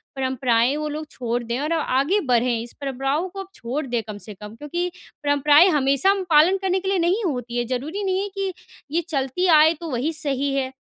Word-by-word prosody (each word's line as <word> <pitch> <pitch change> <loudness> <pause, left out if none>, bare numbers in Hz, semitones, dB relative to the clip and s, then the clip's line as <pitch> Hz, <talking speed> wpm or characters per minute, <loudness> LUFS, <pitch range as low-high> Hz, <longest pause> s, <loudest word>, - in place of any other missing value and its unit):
परंपराएँ 260 -1 +1
वो 305 0 -3
लोग 305 +1 -5
छोड़ 240 -1 -3
दें 235 +2 -3
और 300 +3 -1
आगे 300 +4 +1
बढ़ें? 240 -1 +2
इस 235 +1 -9
परंपराओं 275 +6 -1
को 390 +2 -9
अब 385 - -6
छोड़ 260 +6 -4
दें 240 -1 -1
कम 210 -1 -6
से 210 - -7
कम 210 +2 -11
क्योंकि 345 +7 -3 0.3
परंपराएँ 290 +3 +5
हमेशा 280 +1 +2
हम 395 -1 -1
पालन 325 +5 +5
करने 380 0 +1
के 380 +1 -3
लिए 390 -1 +1
नहीं 360 +6 +1
होती 245 -6 -3
हैं। 240 -1 -1
ज़रूरी 290 - -3
नहीं 380 -1 0
है 405 - -3
कि 390 -1 -1 0.4
ये 335 +3 +1
चलती 275 +4 -1
आए, 315 -1 +6
तो 330 +1 -8
वही 265 +6 -1
सही 280 -3 -1
है। 260 -1 -1
290 Hz, 215 wpm, -23 LUFS, 250-340 Hz, 0.4 s, आए